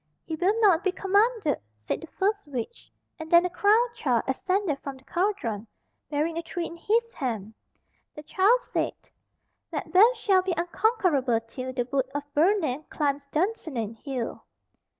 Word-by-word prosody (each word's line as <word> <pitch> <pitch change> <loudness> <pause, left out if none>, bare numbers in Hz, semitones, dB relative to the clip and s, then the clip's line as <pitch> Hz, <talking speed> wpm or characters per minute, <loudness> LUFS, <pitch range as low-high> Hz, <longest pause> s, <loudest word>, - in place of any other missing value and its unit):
"He 320 - -3
will 385 +7 +1
not 380 -5 +5
be 380 - +2
commanded," 400 - +2 0.2
said - - -2
the 325 - -9
first 405 +2 -1
witch, 270 - -6 0.3
and 320 0 -7
then 340 +1 +6
a 360 - -2
crowned 440 +6 +3
child 245 -6 +1
ascended 365 +2 0
from 275 -1 -7
the 260 - -20
cauldron 270 - -1 0.4
bearing 315 +3 -1
a - - -2
tree 340 +1 -4
in 335 - -7
his 460 +7 0
hand 220 -6 -4 0.6
The 300 - -9
child 405 +10 +3
said - - -2 0.8
"Macbeth 445 +6 +4
shall 390 -4 +3
be 365 -1 -1
unconquerable 340 - +1
till 255 +3 -6
The 245 -2 -2
Wood 265 -1 0
of 290 - -1
Birnam 310 -4 +2
climbs 280 -2 -1
Dunsinane 300 - -2
Hill." 250 0 -5
330 Hz, 155 wpm, -27 LUFS, 270-400 Hz, 0.8 s, then